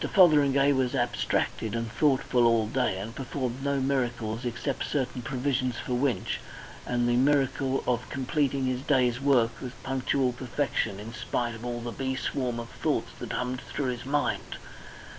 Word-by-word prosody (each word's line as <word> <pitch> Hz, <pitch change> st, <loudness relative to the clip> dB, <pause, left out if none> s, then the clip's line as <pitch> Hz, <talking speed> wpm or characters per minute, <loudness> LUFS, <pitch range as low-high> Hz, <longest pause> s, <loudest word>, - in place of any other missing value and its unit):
Fotheringay 145 Hz, -6 st, +6 dB
was 130 Hz, 0 st, +1 dB
abstracted 120 Hz, -2 st, 0 dB
and 115 Hz, -1 st, -2 dB
thoughtful 125 Hz, -2 st, +3 dB
all 115 Hz, -2 st, +3 dB
that 110 Hz, -, -8 dB
day, 125 Hz, -8 st, +1 dB
and 105 Hz, +4 st, -5 dB
performed 130 Hz, 0 st, -4 dB
no 140 Hz, -1 st, +1 dB
miracles 120 Hz, -4 st, -1 dB
except 120 Hz, +3 st, -2 dB
certain 130 Hz, -3 st, -1 dB
provisions 130 Hz, 0 st, -1 dB
for 125 Hz, -, -3 dB
Winch, 125 Hz, +1 st, 0 dB, 0.5 s
and 120 Hz, -1 st, +1 dB
the 120 Hz, -, +3 dB
miracle 135 Hz, 0 st, +2 dB
of 125 Hz, -1 st, 0 dB
completing 135 Hz, 0 st, 0 dB
his 130 Hz, 0 st, -1 dB
day's 130 Hz, -3 st, +2 dB
work 130 Hz, -5 st, +4 dB
with 125 Hz, -1 st, -6 dB
punctual 135 Hz, -1 st, +1 dB
perfection 120 Hz, -5 st, -1 dB
in 110 Hz, +3 st, -8 dB
spite 120 Hz, -1 st, -2 dB
of 115 Hz, +1 st, -9 dB
all 120 Hz, -1 st, -3 dB
the 120 Hz, 0 st, -4 dB
bee 130 Hz, +1 st, -2 dB
swarm 125 Hz, -2 st, -2 dB
of 115 Hz, 0 st, -6 dB
thoughts -, -, -1 dB
that -, -, -5 dB
hummed 125 Hz, +1 st, -2 dB
through 135 Hz, -3 st, -2 dB
his 120 Hz, -, -9 dB
mind. 145 Hz, +3 st, -1 dB
125 Hz, 165 wpm, -28 LUFS, 120-135 Hz, 0.5 s, Fotheringay